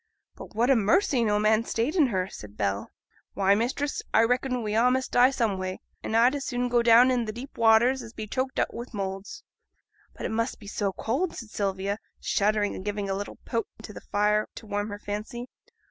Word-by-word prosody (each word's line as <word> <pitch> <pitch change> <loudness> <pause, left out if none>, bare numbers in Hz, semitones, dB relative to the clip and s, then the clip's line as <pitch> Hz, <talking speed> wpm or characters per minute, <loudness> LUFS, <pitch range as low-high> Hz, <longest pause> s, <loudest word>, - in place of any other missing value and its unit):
'But - - -12
what 240 +4 +3
a - - +6
mercy 235 - +3
no 210 -2 +2
man 215 +1 +3
stayed 235 +8 -1
in 310 -7 +5
her,' 190 -5 -1
said 105 - -11
Bell. 100 -1 -1 0.5
'Why, 195 0 +4
mistress, 260 +7 -1
I 225 - +5
reckon 250 +1 0
we 210 -1 -2
a' 235 +3 +4
must 260 +1 0
die 245 +1 +6
some 230 -8 0
way; 185 0 -4 0.2
and 225 - -1
I'd 245 +3 +5
as 285 -1 -3
soon 245 -1 -1
go 240 0 +3
down 235 +2 +6
into 240 -3 0
the - - -2
deep 245 +5 -9
waters 230 +3 +4
as 230 -2 -9
be 220 -2 -6
choked 260 +4 -2
up - - 0
wi' 235 - -5
moulds.' 195 -1 -5 0.7
'But - - -5
it - - -1
must 230 +2 -1
be 210 - -13
so 200 -1 -2
cold,' 265 - -2
said 230 -4 -9
Sylvia, 200 +1 -2 0.2
shuddering 210 0 +1
and - - -7
giving 205 -1 -2
a - - 0
little 200 +1 -6
poke 230 -3 -2 0.2
to 210 - -9
the - - -9
fire 210 +1 +1
to - - -9
warm 205 0 -2
her 205 - -5
fancy. 210 +4 -5
220 Hz, 220 wpm, -27 LUFS, 205-245 Hz, 0.7 s, a